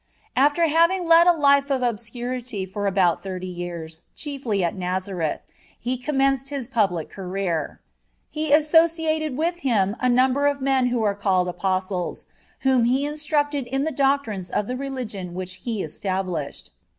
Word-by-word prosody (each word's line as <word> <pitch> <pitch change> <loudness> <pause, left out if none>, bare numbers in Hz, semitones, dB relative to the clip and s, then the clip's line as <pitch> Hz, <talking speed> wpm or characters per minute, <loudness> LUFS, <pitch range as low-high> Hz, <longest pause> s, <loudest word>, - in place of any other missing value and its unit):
After 290 +5 +3
having 335 +4 +3
led 335 +1 +7
a - - +9
life 280 -3 +3
of 265 -2 0
obscurity 240 -1 -3
for 200 +2 -3
about 185 -3 +2
thirty 185 -1 -5
years, 170 -3 -6
chiefly 260 - -2
at 170 - -1
Nazareth, 185 -3 -2 0.4
He 250 +2 -2
commenced 270 0 0
His 275 -4 -4
public 195 -10 0
career. 185 -5 -3 0.5
He 310 -1 -2
associated 315 -1 +3
with 340 +3 -1
Him 215 - +1
a 255 - +2
number 260 +3 +3
of 285 -1 0
men 265 -2 +2
who 240 -2 0
are 205 -1 0
named 185 -2 +2
Apostles, 185 0 -2 0.4
whom 260 -3 +3
He 260 +4 +2
instructed 295 -2 -1
in 270 +2 -1
the 315 - -1
doctrines 270 - 0
of 210 - -1
the 250 - -3
religion 240 -10 -5
which 185 0 -5
He 220 -4 -1
established. 180 -2 -4
245 Hz, 150 wpm, -23 LUFS, 190-280 Hz, 0.5 s, a